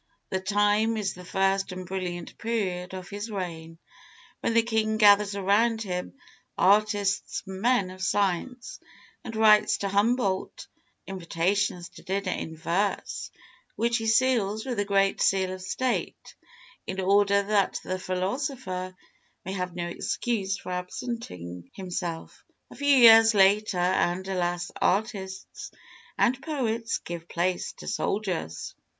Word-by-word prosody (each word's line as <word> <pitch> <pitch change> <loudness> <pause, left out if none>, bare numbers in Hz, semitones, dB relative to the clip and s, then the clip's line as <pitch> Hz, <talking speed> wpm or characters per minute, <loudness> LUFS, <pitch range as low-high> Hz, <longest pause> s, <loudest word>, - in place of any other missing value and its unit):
The 190 - 0
time 205 +3 +2
is 200 -3 -1
the 180 - -11
first 195 +1 0
and 185 0 -6
brilliant 180 -1 -5
period 190 -5 -2
of 185 0 -8
his 205 +3 -5
reign, 165 -5 -6 0.6
when 230 - -1
the 230 - +5
king 220 -1 0
gathers 205 -1 +5
around 220 +4 +2
him 180 +1 -4 0.4
artists 205 0 +2
and 190 0 -7
men 235 -6 +2
of 185 0 -11
science, 200 +6 -1 0.4
and 225 - -7
writes 215 -1 +5
to 200 - -2
Humboldt 200 -1 0 0.4
invitations 180 0 -1
to - - -14
dinner 195 0 -2
in 160 -2 -5
verse, 175 +5 -2 0.5
which 235 +1 +1
he 225 -1 -3
seals 220 -3 +2
with 255 -2 -3
the 205 - 0
great 195 -1 +2
Seal 190 -1 +2
of 185 - -8
State, 235 +7 -3 0.5
in 190 - -4
order 200 +1 +3
that 200 -1 +1
the 185 0 -3
philosopher 185 0 -3 0.5
may 190 - -4
have 180 -2 -4
no 175 -1 -3
excuse 195 +2 -2
for - - -8
absenting 180 - -6
himself. 175 -3 -5 0.3
A - - -11
few 285 - -3
years 225 -2 +8
later, 200 0 +4
and, 180 +1 +1
alas, 175 -2 -2
artists 190 -2 -2 0.5
and 255 +2 +2
poets 235 -6 -1
give 170 -1 -8
place 175 +1 -1
to - - -12
soldiers! 180 - -2
195 Hz, 135 wpm, -27 LUFS, 185-220 Hz, 0.6 s, years